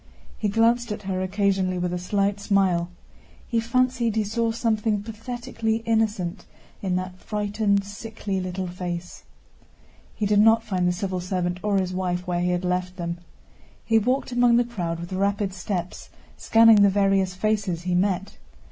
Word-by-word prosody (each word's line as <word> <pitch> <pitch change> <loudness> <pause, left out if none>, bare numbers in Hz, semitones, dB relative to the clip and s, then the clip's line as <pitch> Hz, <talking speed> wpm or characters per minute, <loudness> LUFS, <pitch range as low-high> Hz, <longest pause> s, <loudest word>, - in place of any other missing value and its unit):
He 210 - -1
glanced 230 +2 +2
at 210 0 -5
her 190 -1 -2
occasionally 190 -1 0
with 180 0 -1
a 180 - -2
slight 200 +2 0
smile. 190 -4 +1 0.6
He 230 - +1
fancied 235 -1 +1
he 220 - +2
saw 225 +2 0
something 220 -2 0
pathetically 225 0 -3
innocent 215 -5 0 0.4
in 185 -2 -1
that 185 0 -4
frightened, 205 -1 0
sickly 205 -1 -5
little 185 +1 -3
face. 175 -1 -6 0.9
He 210 - -1
did 205 0 +3
not 225 +1 +5
find 185 -5 0
the - - +3
civil 185 0 -3
servant 180 0 -2
or 205 -1 +1
his 185 -1 -1
wife 180 -1 -2
where 175 -1 -1
he 180 - +1
had 180 0 -1
left 180 0 -1
them. 170 -1 -4 0.7
He 225 -1 +4
walked 255 +4 0
among 245 -1 +4
the 240 - +4
crowd 175 -9 -4
with 170 +2 -7
rapid 200 0 0
steps, 180 -1 -4 0.3
scanning 225 -2 +6
the 200 - +6
various 195 -2 +2
faces 200 -4 -1
he 180 0 -1
met. 190 +1 0
200 Hz, 165 wpm, -24 LUFS, 180-220 Hz, 0.9 s, scanning